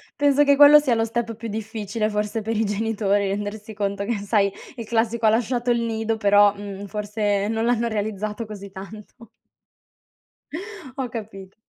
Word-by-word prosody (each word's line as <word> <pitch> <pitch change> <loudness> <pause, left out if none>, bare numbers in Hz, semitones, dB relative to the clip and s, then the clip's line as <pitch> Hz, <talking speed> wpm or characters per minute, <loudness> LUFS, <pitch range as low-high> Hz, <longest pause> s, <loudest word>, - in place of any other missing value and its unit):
penso 290 0 +4
che 285 -1 +5
quello 290 +1 +9
sia 280 -5 +1
lo 225 0 +1
step 230 0 -3
più 230 +2 -7
difficile, 215 0 -3
forse, 210 +1 -2
per 225 +2 -3
i 220 - +2
genitori, 205 -1 0
rendersi 205 +2 -4
conto 200 -1 -2
che 230 +1 -1
sai, 200 -1 +1 0.2
il 230 -3 -6
classico 230 0 0
"ha - - +7
lasciato 240 +2 +1
il 235 - +2
nido," 225 -1 -1
però, 205 -1 +5
mhmm, 200 -1 -7
forse 205 0 -1
non 225 0 -1
l'hanno 235 -1 +1
realizzato 215 0 -3
così 200 -2 -9
tanto. 210 +4 -11 1.7
Ho 265 -2 -2
capito. 200 -5 -8
220 Hz, 165 wpm, -23 LUFS, 205-230 Hz, 1.7 s, quello